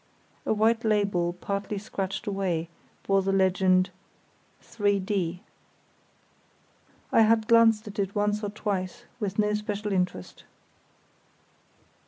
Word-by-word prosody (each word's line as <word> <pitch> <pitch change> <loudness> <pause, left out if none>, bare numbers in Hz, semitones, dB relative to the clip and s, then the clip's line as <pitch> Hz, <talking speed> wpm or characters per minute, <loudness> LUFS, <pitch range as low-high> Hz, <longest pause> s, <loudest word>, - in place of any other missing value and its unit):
A - - +2
white 225 +2 +2
label 200 -5 +1
partly 200 +3 -4
scratched 195 -1 -4
away 185 -5 -2 0.4
bore 195 0 +3
the 195 +1 0
legend 185 -1 +3 0.7
"3_d_." 195 -4 -1 1.7
I - - +5
had 220 0 +3
glanced 230 -2 +5
at 210 +1 -7
it 195 0 -1
once 210 +1 0
or 205 - -1
twice 205 +2 -3 0.2
with 200 -3 -3
no 210 0 +2
special 210 0 -3
interest. 180 - -3
200 Hz, 110 wpm, -27 LUFS, 190-210 Hz, 1.7 s, I